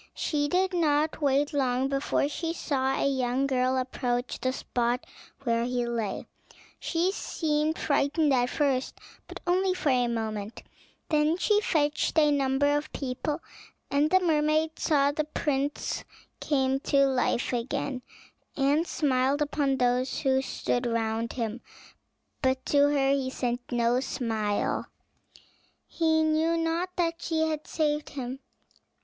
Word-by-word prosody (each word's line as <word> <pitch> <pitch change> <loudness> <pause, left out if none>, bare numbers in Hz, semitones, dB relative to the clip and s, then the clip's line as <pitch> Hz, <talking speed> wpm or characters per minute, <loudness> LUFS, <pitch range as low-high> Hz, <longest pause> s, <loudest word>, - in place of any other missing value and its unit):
She 290 -2 0
did 370 +4 +1
not 310 -2 +1
wait 285 +1 +2
long 260 -2 +1
before 275 +1 0
she 330 +3 -3
saw 270 -5 -1
a - - +1
young 260 -1 0
girl 260 -1 +1
approach 245 -1 -2
the 255 - +1
spot 245 -1 -1 0.4
where 230 -2 +1
he 245 0 -1
lay. 230 -4 -3 0.5
She 345 +2 0
seemed 310 -4 -1
frightened 290 +1 +2
at 245 -1 +2
first, 270 -3 0 0.3
but - - -8
only 370 +1 +2
for 315 - 0
a 250 -2 +3
moment; 220 -2 -4 0.5
then 305 +1 +2
she 420 +3 +2
fetched 300 -5 0
a 300 -1 +5
number 285 +1 +2
of 295 +1 -3
people, 285 +4 -3 0.5
and 290 +2 +3
the 375 +2 +5
mermaid 315 -2 +1
saw 285 -3 +3
that 290 - -14
the 305 0 -2
prince 285 -1 -1 0.4
came 270 -2 +1
to 275 0 +3
life 260 -2 0
again, 255 +2 -2 0.6
and 290 +4 +2
smiled 270 -1 +1
upon 285 -2 0
those 250 +1 +1
who 265 -2 +2
stood 245 -2 -2
round 230 0 -1
him. 230 -1 -3 0.8
But 260 -1 0
to 285 0 +4
her 275 -2 +2
he 275 -2 0
sent 245 -1 -3
no 240 0 +2
smile; 220 -5 -1 1.0
he 320 -1 +1
knew 315 +2 +2
not 330 +2 0
that 335 -1 -1
she 320 -1 0
had 310 -1 -3
saved 300 -1 -1
him. 260 -1 -5
275 Hz, 140 wpm, -28 LUFS, 255-310 Hz, 1.0 s, a